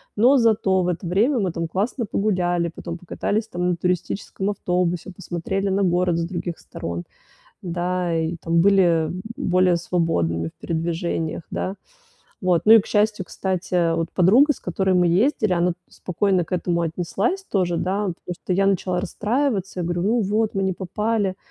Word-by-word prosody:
но 250 +6 +5
зато 215 -6 +3
в - - -1
это 180 +1 -2
время 225 - +2
мы, 190 -4 0
там, 165 0 -3
классно 215 +8 -2
погуляли, 175 -4 0
потом 170 0 -6
покатались, 205 +5 -2
там, 180 -4 -2
на - - 0
туристическом 180 +2 -2
автобусе, 180 -2 -1
посмотрели 195 +2 -3
на 195 +1 +1
город 175 -1 +2
с 170 - 0
других 175 -1 -5
сторон, 85 +1 -6 0.6
да 180 0 -2
и, 160 +1 -2
там, 165 +1 +1
были, 195 +2 +5 0.2
м, - - -4
б 185 - -5 0.2
более 180 -1 +2
свободными 85 - 0
в - - -19
передвижениях, 165 0 -2
да". 190 +2 -3 0.7
Вот, 180 -3 +2
ну 220 - +8
и 225 - +8
к - - -10
счастью, 210 -2 +1
кстати, 185 0 -4
э, 170 -2 +3
вот, 165 0 -2
подруга, 230 - +5
с - - -13
которой 190 +1 0
мы 180 -1 +4
ездили, 215 - +2
она 175 +1 +2 0.2
спокойно 185 0 0
к 165 - -14
этому 175 -1 0
отнеслась 185 - -1
тоже, 180 - 0
да. 195 +2 -1 0.2
Просто 180 +1 -4
я 195 +2 +2
начала 185 -2 +1
расстраиваться, 205 0 -1
я - - -1
говорю: 175 0 -1
"Ну 225 +5 +2
вот, 210 +2 0
мы 195 - 0
не 190 - +1
попали, 200 +1 -1
180 Hz, 175 wpm, -22 LUFS, 175-200 Hz, 0.7 s, ну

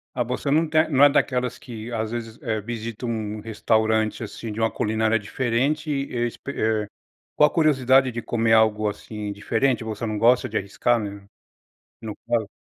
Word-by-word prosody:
Mas 125 -1 0
você 125 +3 -2
não 160 +3 +3
tem 155 +1 +2
não 140 -2 +4
é 145 - +9
daquelas 125 -3 0
que, 115 -2 -8
às 110 -1 -2
vezes, 115 -1 -6
eh, 110 -6 -2
visita 115 +1 -6
um 110 -2 -3
um - - -7
restaurante, 110 0 0
assim, 115 +1 -7
de 105 - -6
uma 115 0 +1
culinária 110 +1 +1
diferente 130 +8 -1
e 140 -1 -1 0.2
espe 120 - -7
eh, 110 -4 0 0.5
com - - +3
a 150 - +7
curiosidade 135 -4 +3
de 120 0 -4
comer 115 -1 +1
algo 110 -1 +3
assim 105 0 -6
diferente. 115 +4 0
Você 110 +1 -4
não 110 -1 -2
gosta 120 +4 +4
de 110 - -1
arriscar 110 +4 0
né, 100 -2 -7 0.8
no 110 -2 -6
caso? 115 -3 +1
115 Hz, 185 wpm, -24 LUFS, 110-125 Hz, 0.8 s, é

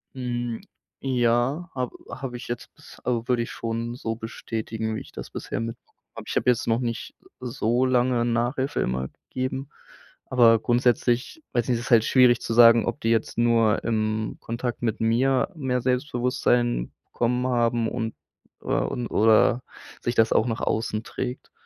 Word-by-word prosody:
Hm, 120 -2 -3 0.4
ja, 130 +6 +1
habe 125 -2 -3
habe 125 -3 -5
ich 120 - -9
jetzt 120 - -6
bis, - - -15
al 120 -1 -1
würde 120 -2 +2
ich - - -6
schon 115 +1 -3
so 115 -2 -4
bestätigen, 110 -1 -4
wie - - -4
ich - - -12
das - - -8
bisher - - -4
mitbe 115 +1 -5
habe. - - -37 0.2
Aber - - -8
ich - - -4
habe - - +4
jetzt 120 -1 0
noch 115 +1 +2
nicht 115 -2 -4 0.2
so 120 0 0
lange 125 -1 +2
Nachhilfe 120 +4 0
immer 65 +1 -1
gegeben. 130 +2 -5 0.6
Aber 115 -3 +5
grundsätzlich 120 - +1
weiß 120 -2 +1
ich - - -12
nicht, 120 - +2
das - - -7
ist - - -6
halt 115 -1 +6
schwierig 125 -2 +5
zu 115 - -3
sagen, 115 -1 +7
ob - - -2
die 115 - 0
jetzt 115 0 0
nur 115 -3 +3
im 110 -1 -1
Kontakt 120 +1 -4
mit 115 -3 -1
mir 125 +6 +2
mehr 130 -5 -1
Selbstbewusstsein 125 - 0
bekommen 125 +1 0
haben 120 -2 +1
und, 115 -2 -3 0.5
äh - - -14
und 120 -1 -1
oder 115 +3 +4 0.4
sich 120 - -2
das 115 - +4
auch 110 - +3
nach 115 -1 -2
außen 110 0 -1
trägt. 125 0 -5
120 Hz, 175 wpm, -25 LUFS, 115-125 Hz, 0.6 s, sagen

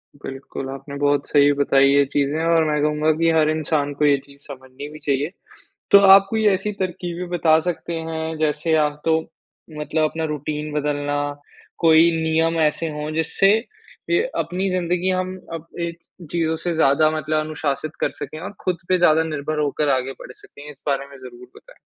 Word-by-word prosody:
बिल्कुल, 135 -1 -7
आपने 135 +1 -8
बहुत 145 0 +1
सही 145 -1 +5
बताई 140 -1 +3
ये 140 +1 +5
चीज़े 145 +3 0
और 165 -1 +3
मैं 150 -1 0
कहूँगा 150 +1 +2
कि 165 0 +2
हर 155 -1 +3
इंसान 155 -2 -1
को 150 - +3
ये 145 -1 +4
चीज़ 140 0 -18
समझनी 130 0 -9
भी 155 0 -11
चाहिए। 140 +3 0 0.6
तो 200 - +9 0.2
आप 195 0 +6
कोई 220 -1 0
ऐसी 200 +3 -2
तरकीबें 180 -1 -4
बता 160 -2 +4
सकते 170 0 -4
हैं, 160 0 -4
जैसे 155 +1 0
आप 150 -1 0
तो 160 -1 +3 0.6
मतलब 155 +1 0
अपना 160 0 -4
रुटीन 150 +1 -4
बदलना, 145 -1 -1 0.6
कोई 165 +1 +5
नियम 165 +1 +1
ऐसे 155 +1 +1
हों, 150 0 -5
जिससे 180 +5 +3 0.6
अ, - - +1 0.3
अपनी 185 +3 -1
ज़िंदगी 180 0 -1
हम 185 0 -2 0.2
अप 165 -1 -6
ऐ 170 0 -1 0.4
चीज़ों 160 -1 0
से 175 - 0
ज़्यादा 155 -1 +3
मतलब 155 0 -1
अनुशासित 155 -1 -3
कर - - +1
सकें 155 - -6
और 200 +4 -6
खुद 180 -2 0
पे 185 - +3
ज़्यादा 160 -2 +4
निर्भर 155 -1 -3
होकर 150 0 0
आगे 130 +1 -3
बढ़ - - -10
सकें? 145 +3 -13
इस 145 - -13
बारे 140 -1 -1
में 140 0 -14
ज़रूर 125 -1 -12
बताएँ। - - -18
155 Hz, 180 wpm, -21 LUFS, 145-165 Hz, 0.6 s, तो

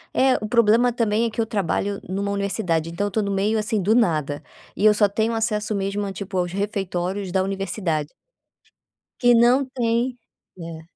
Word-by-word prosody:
É, 260 0 +4
o - - -2
problema 235 +2 +4
também 225 -1 +1
é 230 - 0
que 230 - -2
eu - - 0
trabalho 200 -1 -1
numa 200 +2 -2
Universidade, 190 -5 -1
então 200 +4 -1
eu 205 - -5
tô 220 - 0
no 200 - -2
meio, 205 +3 +1
assim, 215 -1 -1
do 210 +5 +2
nada 155 - +1 0.3
e 210 - +1
eu 215 - +7
só 205 -1 +3
tenho 220 +3 0
acesso 215 -1 -1
mesmo 200 +1 -2
a 195 - -5
tipo, 190 -1 -5
aos 175 -1 0
refeitórios 195 -1 -3
da 190 - +2
Universidade 185 -5 -2 1.1
que 245 -1 +5
não 245 +4 +4
tem 245 -1 -1 0.4
é. 165 -1 -7
205 Hz, 185 wpm, -23 LUFS, 190-225 Hz, 1.1 s, eu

